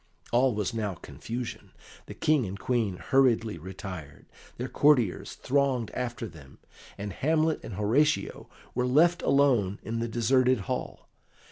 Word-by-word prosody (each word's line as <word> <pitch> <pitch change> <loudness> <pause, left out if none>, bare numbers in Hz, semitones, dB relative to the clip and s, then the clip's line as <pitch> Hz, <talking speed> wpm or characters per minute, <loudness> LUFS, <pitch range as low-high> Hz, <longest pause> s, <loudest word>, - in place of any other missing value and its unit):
All 125 0 +3
was 105 0 -2
now 105 -4 -2
confusion; 110 - -7 0.3
the - - -8
King 150 -8 +2
and 95 +2 -6
Queen 115 -7 0
hurriedly 115 -6 +2
retired; 90 -4 -8 0.3
their 125 - -3
courtiers 130 -9 +2
thronged 135 -4 0
after 120 -1 -3
them, 70 -7 -14 0.4
and 100 -1 -5
Hamlet 155 - +1
and 110 - -7
Horatio 115 +10 +1 0.2
were 125 +1 0
left 170 +7 +4
alone 125 -9 +3
in 115 +1 -3
the 115 - -1
deserted 125 +1 +2
hall. 95 - -5
115 Hz, 135 wpm, -28 LUFS, 100-135 Hz, 0.4 s, left